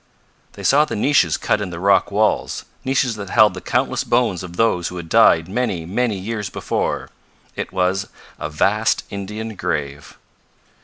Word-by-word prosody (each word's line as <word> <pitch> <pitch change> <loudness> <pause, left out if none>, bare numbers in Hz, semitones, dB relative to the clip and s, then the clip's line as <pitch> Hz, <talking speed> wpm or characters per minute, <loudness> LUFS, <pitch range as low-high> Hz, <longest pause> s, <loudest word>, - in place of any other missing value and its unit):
They - - -10
saw 145 +2 +5
the 155 - -4
niches 105 - +3
cut 105 - 0
in 100 - -3
the 85 -1 -7
rock 100 +1 +3
walls, 105 +2 0 0.2
niches 130 -3 0
that 100 -2 -7
held 110 -3 +5
the 90 - -8
countless - - 0
bones 115 -7 +1
of 90 -1 -9
those 90 -7 +2
who 90 - -6
had 85 -2 -7
died 80 0 +5
many, 100 -5 -2
many 105 +4 -1
years 105 +1 -4
before. - - -3 0.4
It - - -4
was 95 +1 0 0.3
a - - -4
vast 105 +8 +1
Indian 105 +2 -5
grave. 70 -4 -4
100 Hz, 165 wpm, -20 LUFS, 90-110 Hz, 0.4 s, saw